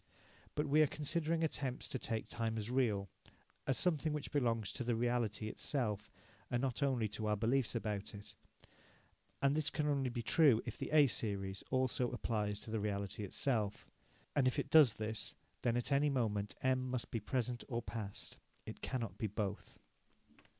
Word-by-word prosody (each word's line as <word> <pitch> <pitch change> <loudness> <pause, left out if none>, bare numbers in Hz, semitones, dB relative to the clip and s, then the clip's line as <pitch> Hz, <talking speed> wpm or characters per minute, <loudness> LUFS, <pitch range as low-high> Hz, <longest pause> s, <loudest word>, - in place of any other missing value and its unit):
But 150 - +1
we 150 +2 +5
are 155 - +6
considering 160 +3 0
attempts 135 -5 -1
to 130 - -2
take 110 -2 -2
time 115 -1 -2
as 110 +2 -1
real, 110 -7 +2 0.6
as 135 - +2
something 155 -2 +2
which 150 -2 -4
belongs 115 -7 +1
to - - -4
the 120 -1 +1
reality 115 -3 0
itself, 110 -3 -1 0.4
and 120 - +1
not 130 +1 -1
only 130 -6 +2
to 110 +1 -3
our 105 - +3
beliefs 120 +3 +1
about 105 -3 -2
it, 100 - -10 1.1
and 140 0 +5
this 155 -1 +1
can 150 +1 -1
only 140 -3 +1
be 120 -1 -3
so 145 -9 +6
if - - -4
the - - -4
A 150 -2 +7
series 100 -6 -1
also 130 -1 +1
applies 105 -4 -1
to 110 - -7
the 110 - 0
reality 100 0 -2
itself. 105 0 -1 0.5
And 135 -3 +4
if 130 - +1
it 140 - -2
does 150 -8 +8
this, 110 0 -3 0.3
then 120 0 +2
at 120 - -1
any 140 +2 +4
moment 105 -6 0
M 130 0 +2
must 125 -1 -3
be 115 - -1
present 120 +2 -1
or 120 -3 -2
past. 105 -4 -5 0.3
It - - -8
cannot 125 -3 -3
be 110 - 0
both. 105 -1 -4
120 Hz, 180 wpm, -37 LUFS, 110-135 Hz, 1.1 s, does